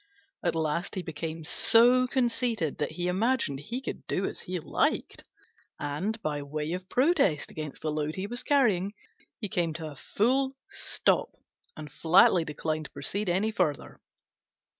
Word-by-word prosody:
At 170 Hz, -3 st, +1 dB
last 160 Hz, +2 st, -1 dB
he 185 Hz, -, -3 dB
became 160 Hz, 0 st, -5 dB
so 245 Hz, +8 st, +5 dB
conceited 240 Hz, -, 0 dB
that 150 Hz, +1 st, -1 dB
he 175 Hz, +2 st, -2 dB
imagined 190 Hz, -, +1 dB
he 235 Hz, -, -4 dB
could 265 Hz, -, -7 dB
do 190 Hz, -, 0 dB
as -, -, -4 dB
he 180 Hz, 0 st, -4 dB
liked, -, -, -1 dB, 0.6 s
and, 175 Hz, +10 st, -2 dB
by 150 Hz, -1 st, -1 dB
way 150 Hz, +3 st, -3 dB
of 185 Hz, +1 st, -6 dB
protest 260 Hz, -, +2 dB
against 155 Hz, -2 st, -7 dB
the 155 Hz, -, 0 dB
load 150 Hz, 0 st, -2 dB
he 190 Hz, -, -3 dB
was 240 Hz, +4 st, -4 dB
carrying, 210 Hz, -9 st, +2 dB, 0.4 s
he 210 Hz, -, -3 dB
came 170 Hz, -4 st, 0 dB
to 160 Hz, -1 st, -6 dB
a -, -, -11 dB
full 265 Hz, -, +1 dB, 0.2 s
stop 390 Hz, 0 st, 0 dB, 0.4 s
and 150 Hz, -2 st, -8 dB
flatly 170 Hz, +3 st, +5 dB
declined 155 Hz, 0 st, -3 dB
to -, -, -10 dB
proceed 200 Hz, -1 st, -2 dB
any 195 Hz, +5 st, +1 dB
further. 170 Hz, -9 st, -2 dB
180 Hz, 160 wpm, -28 LUFS, 155-230 Hz, 0.6 s, so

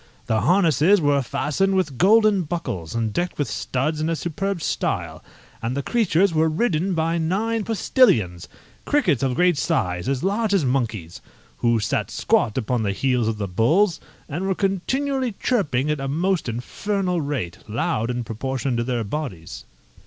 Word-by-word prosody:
The 110 Hz, -2 st, +1 dB
harnesses 175 Hz, -, +4 dB
were 145 Hz, -3 st, +2 dB
fastened 150 Hz, +9 st, 0 dB
with 155 Hz, -9 st, -1 dB
golden 215 Hz, +1 st, +5 dB
buckles, 145 Hz, -, -4 dB
and 115 Hz, -2 st, -1 dB
decked 175 Hz, +1 st, -2 dB
with 145 Hz, -, -1 dB
studs 150 Hz, +7 st, -2 dB
in 155 Hz, -, 0 dB
a 165 Hz, -, 0 dB
superb 180 Hz, +4 st, -3 dB
style, -, -, -2 dB, 0.4 s
and 120 Hz, +4 st, -2 dB
the 140 Hz, -, -2 dB
creatures 200 Hz, -, +2 dB
were 160 Hz, 0 st, +3 dB
ridden 180 Hz, 0 st, 0 dB
by 165 Hz, +1 st, 0 dB
nine 210 Hz, +7 st, 0 dB
postillions, 125 Hz, -, +2 dB, 0.4 s
crickets 185 Hz, -, +1 dB
of 135 Hz, -2 st, +1 dB
a -, -, -5 dB
great 180 Hz, -2 st, +3 dB
size, 95 Hz, -, -1 dB
as 135 Hz, +2 st, -1 dB
large 205 Hz, +2 st, +1 dB
as 170 Hz, -8 st, +2 dB
monkeys, 115 Hz, -10 st, -2 dB, 0.4 s
who 115 Hz, -1 st, +2 dB
sat 105 Hz, -, -1 dB
squat 105 Hz, -, +1 dB
upon 125 Hz, -1 st, 0 dB
the 100 Hz, -2 st, 0 dB
heads 125 Hz, +2 st, +1 dB
of 110 Hz, -1 st, -1 dB
the 100 Hz, -1 st, -3 dB
bulls, 160 Hz, -, +2 dB, 0.3 s
and 170 Hz, +6 st, -3 dB
were 190 Hz, -, +1 dB
continually 255 Hz, +7 st, -1 dB
chirping 150 Hz, -, 0 dB
at 150 Hz, -, -2 dB
a 135 Hz, -, -3 dB
most 170 Hz, +1 st, 0 dB
infernal 180 Hz, -, -2 dB
rate, 140 Hz, -, -3 dB
loud 115 Hz, +1 st, -1 dB
in 125 Hz, 0 st, -2 dB
proportion 130 Hz, +3 st, -3 dB
to 120 Hz, -, 0 dB
their 120 Hz, -1 st, -1 dB
bodies. 95 Hz, -, -6 dB
150 Hz, 165 wpm, -23 LUFS, 120-190 Hz, 0.4 s, golden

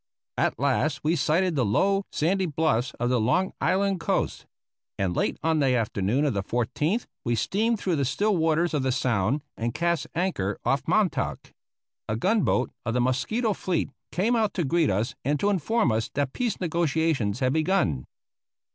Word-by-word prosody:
At -, -, +1 dB
last 140 Hz, +3 st, 0 dB
we 160 Hz, +3 st, +2 dB
sighted 170 Hz, +4 st, +1 dB
the 135 Hz, -, +2 dB
low, 195 Hz, -, +2 dB
sandy 185 Hz, +4 st, +1 dB
bluffs 150 Hz, -6 st, 0 dB
of 120 Hz, +1 st, 0 dB
the 125 Hz, -, +2 dB
Long 185 Hz, +12 st, +1 dB
Island 195 Hz, 0 st, +1 dB
coast, 165 Hz, -, -1 dB, 0.5 s
and 95 Hz, -3 st, -1 dB
late -, -, 0 dB
on 160 Hz, -1 st, +2 dB
the 135 Hz, -3 st, +3 dB
afternoon 110 Hz, +3 st, 0 dB
of 140 Hz, -, +1 dB
the 100 Hz, -, -1 dB
14th 145 Hz, -, -1 dB, 0.2 s
we 120 Hz, -1 st, 0 dB
steamed 220 Hz, -, +1 dB
through 180 Hz, -5 st, 0 dB
the 140 Hz, -, +1 dB
still 205 Hz, +11 st, +1 dB
waters 165 Hz, +1 st, +1 dB
of 150 Hz, -, +1 dB
the 130 Hz, 0 st, 0 dB
Sound 125 Hz, +2 st, 0 dB
and 115 Hz, +1 st, -3 dB
cast 170 Hz, -3 st, 0 dB
anchor 160 Hz, -, -1 dB
off 135 Hz, +4 st, 0 dB
Montauk. 200 Hz, +1 st, 0 dB, 0.6 s
A 105 Hz, -, 0 dB
gun 200 Hz, -, +2 dB
boat 125 Hz, -, +1 dB
of 115 Hz, -1 st, -2 dB
the -, -, +2 dB
Mosquito 170 Hz, -, 0 dB
fleet 175 Hz, -7 st, -2 dB, 0.2 s
came 220 Hz, +7 st, +1 dB
out 220 Hz, -3 st, +1 dB
to 175 Hz, -, 0 dB
greet 160 Hz, +2 st, +2 dB
us 105 Hz, +5 st, 0 dB
and 145 Hz, +2 st, 0 dB
to 205 Hz, -, +2 dB
inform 195 Hz, -, +1 dB
us 110 Hz, +1 st, -1 dB
that 140 Hz, -2 st, -1 dB
peace 240 Hz, -4 st, -2 dB
negotiations 160 Hz, -, 0 dB
had 130 Hz, 0 st, +1 dB
begun. 155 Hz, -, +1 dB
150 Hz, 180 wpm, -26 LUFS, 125-185 Hz, 0.6 s, the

